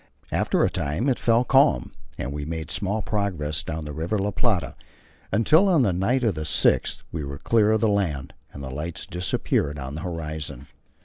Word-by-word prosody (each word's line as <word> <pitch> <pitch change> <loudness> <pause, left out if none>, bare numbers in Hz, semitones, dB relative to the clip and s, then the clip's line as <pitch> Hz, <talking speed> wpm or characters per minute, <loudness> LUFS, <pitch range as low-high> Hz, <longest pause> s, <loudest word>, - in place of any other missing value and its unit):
After - - +2
a - - +2
time 75 - -1
it 130 - +1
fell 115 +1 +3
calm, 130 - +3 0.3
and 70 - -4
we 75 0 -4
made 80 +1 -4
small 105 +2 -1
progress 90 -8 -1
down 80 -1 -5
the 75 - -6
River 85 +8 -1
La 100 +1 0
Plata, 105 -3 0 0.6
until, 155 - +4
on 165 -8 +4
the 100 -6 +2
night 120 +9 +1
of 110 -4 +2
the 80 - -5
6th, 75 - +2
we 80 -2 -3
were 70 0 -5
clear 110 +5 +3
of 110 -1 +2
the 115 - +4
land, 85 -10 0 0.2
and 70 - -9
the 65 - -5
lights 75 +5 -5
disappeared 90 -4 -1
on 65 0 -5
the 75 - -5
horizon. 80 -6 -5
85 Hz, 195 wpm, -25 LUFS, 75-110 Hz, 0.6 s, until